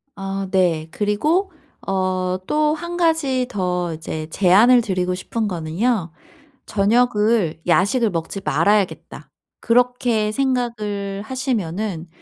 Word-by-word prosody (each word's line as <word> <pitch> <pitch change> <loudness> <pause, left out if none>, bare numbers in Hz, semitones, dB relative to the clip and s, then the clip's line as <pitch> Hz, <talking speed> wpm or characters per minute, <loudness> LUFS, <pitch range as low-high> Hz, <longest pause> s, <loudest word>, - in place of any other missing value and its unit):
아 195 0 -4
네. 170 -4 +1
그리고 300 - 0 0.4
어 185 -1 0
또 300 +4 +1
1 345 +2 -6
가지 290 -7 +1
더 180 -3 -2
이제 155 0 -6
제안을 205 +8 +5
드리고 185 -4 -1
싶은 215 +4 -3
거는요. 175 +2 -1 0.5
'저녁을 210 -5 +1
야식을 200 +7 +3
먹지 165 +3 -4
말아야겠다.' 205 -2 0 0.3
그렇게 240 -2 +1
생각을 215 -6 -2
하시면은 215 - -3
205 Hz, 225 characters per minute, -21 LUFS, 185-245 Hz, 0.5 s, 제안을